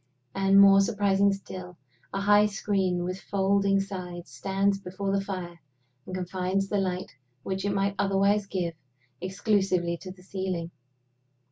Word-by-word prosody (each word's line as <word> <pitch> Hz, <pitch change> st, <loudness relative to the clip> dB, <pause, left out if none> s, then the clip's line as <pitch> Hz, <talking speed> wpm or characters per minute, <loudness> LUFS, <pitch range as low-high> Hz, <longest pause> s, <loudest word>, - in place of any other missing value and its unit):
And, 195 Hz, 0 st, +4 dB
more 195 Hz, 0 st, +8 dB
surprising 200 Hz, 0 st, +2 dB
still, 185 Hz, -2 st, -7 dB, 0.3 s
a 195 Hz, -, -2 dB
high 205 Hz, +1 st, +5 dB
screen 195 Hz, -3 st, 0 dB
with 185 Hz, +1 st, -4 dB
folding 195 Hz, +1 st, +2 dB
sides 180 Hz, -3 st, -6 dB
stands 195 Hz, 0 st, 0 dB
before 195 Hz, +1 st, -4 dB
the 195 Hz, 0 st, +1 dB
fire, 180 Hz, -3 st, -6 dB, 0.5 s
and 185 Hz, -, -5 dB
confines 185 Hz, +1 st, -1 dB
the 205 Hz, -, +1 dB
light 185 Hz, -1 st, -3 dB, 0.3 s
which 190 Hz, +1 st, -3 dB
it 200 Hz, -, +1 dB
might 200 Hz, 0 st, +1 dB
otherwise 200 Hz, +1 st, +2 dB
give 180 Hz, -4 st, -2 dB, 0.5 s
exclusively 190 Hz, -2 st, 0 dB
to 185 Hz, -, -10 dB
the 185 Hz, -1 st, -15 dB
ceiling. 185 Hz, -3 st, -3 dB
195 Hz, 140 wpm, -27 LUFS, 185-200 Hz, 0.5 s, more